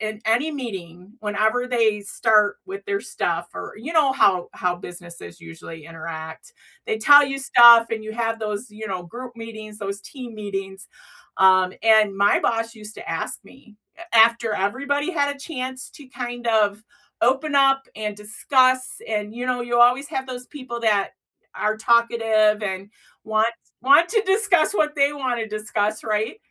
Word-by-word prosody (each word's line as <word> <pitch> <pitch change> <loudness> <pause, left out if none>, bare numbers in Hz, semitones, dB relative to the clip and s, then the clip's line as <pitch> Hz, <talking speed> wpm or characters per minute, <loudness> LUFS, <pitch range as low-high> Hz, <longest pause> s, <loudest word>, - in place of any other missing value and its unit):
in 215 0 -5
any 245 +8 +1
meeting 190 - -8
whenever 215 +4 0
they 225 -4 +1
start 210 0 +2
with 390 +1 -8
their 395 0 -1
stuff, - - -3
or - - -7
you 260 +10 -7
know 300 -4 +4
how 185 -8 +2
how 180 -1 -1
businesses 175 - -11
usually 150 - -11
interact. 160 -1 -9 0.3
They 220 - -2
tell 290 +5 +7
you 275 0 -4
stuff 235 -3 +7
and 225 -1 -3
you 220 - -6
have 225 -1 -2
those, 210 +2 -4
you 215 +1 -8
know, 185 -2 -4
group 240 +6 -10
meetings, 220 -2 -9
those 200 -1 -5
team 245 0 -10
meetings. 195 -2 -6 0.5
Um, 185 -1 +5
and 215 -3 +4
my 200 +1 +3
boss 230 0 -1
used 215 0 -10
to - - -10
ask - - -3
me 235 -6 -19 0.2
a 345 -7 -4
after 230 0 +4
everybody 280 - -1
had 285 -2 0
a - - -16
chance 260 -4 -6
to 290 -6 -14
kind 245 -1 -6
of 210 -1 +1 0.4
open 270 +5 +1
up 270 -1 +4
and 210 -1 -4
discuss, 255 +5 +2 0.3
and, 210 -1 -3
you 245 +1 -5
know, 250 -1 -1
you 240 0 -1
always 250 +4 +4
have 265 0 -4
those 250 -1 -7
people 255 -5 -8
that 210 -4 +1 0.4
are 215 0 -1
talkative 225 -2 +2
and 195 -1 -4 0.4
want 220 0 +1 0.4
want 285 +6 +5
to 440 -2 +1
discuss 385 -4 +2
what 300 -3 +1
they 280 +1 +3
wanna 250 -5 -3
discuss, 215 0 -2
right? 215 - -2
225 Hz, 165 wpm, -22 LUFS, 210-260 Hz, 0.5 s, tell